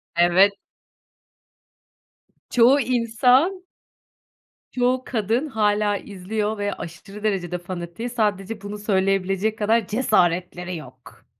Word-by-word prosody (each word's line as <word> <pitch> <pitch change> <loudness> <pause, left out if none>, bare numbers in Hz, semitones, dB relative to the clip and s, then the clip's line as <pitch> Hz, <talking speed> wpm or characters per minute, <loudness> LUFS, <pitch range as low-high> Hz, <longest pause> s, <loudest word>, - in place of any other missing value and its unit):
Evet. 180 +4 +5 2.0
Çoğu 250 +4 +5
insan 250 - +2 1.1
Çoğu 255 +1 +1
kadın 230 +4 -1
hâlâ 210 -4 +1
izliyor 210 +3 -4
ve 205 -1 -2
aşırı 195 +5 -10
derecede 180 -4 -1
fanatiği. 175 +5 -6
Sadece 210 -2 -2
bunu 205 +1 -6
söyleyebilecek 195 +1 0
kadar 220 0 +1
cesaretleri 180 -5 0
yok. 155 - -14
210 Hz, 90 wpm, -23 LUFS, 190-230 Hz, 2.0 s, Evet